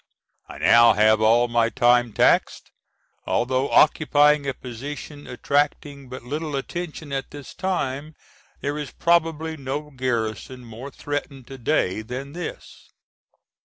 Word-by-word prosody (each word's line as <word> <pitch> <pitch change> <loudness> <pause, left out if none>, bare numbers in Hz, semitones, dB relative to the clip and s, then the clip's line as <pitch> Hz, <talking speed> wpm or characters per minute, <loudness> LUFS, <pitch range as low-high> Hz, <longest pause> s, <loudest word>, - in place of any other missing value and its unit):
I - - -9
now 115 -1 +6
have 110 +1 +4
all 115 +2 +4
my 120 -1 +2
time 120 -1 +3
taxed. - - +2 0.6
Although 130 +3 0
occupying 150 -1 +4
a 135 - -1
position 145 +4 -8
attracting 140 +1 -1
but 130 -1 -8
little 150 +4 -4
attention 155 0 -5
at 135 -1 -3
this 145 -2 -10
time 155 -5 -3 0.5
there 145 +1 -2
is 145 -3 -5
probably 160 -1 0
no 145 +2 -5
garrison 125 -1 -3
more 115 +4 -9
threatened 145 -2 -5
to 135 -1 -9
day 110 -6 0
than 130 +5 -7
this. 175 0 -8
135 Hz, 130 wpm, -23 LUFS, 120-150 Hz, 0.6 s, now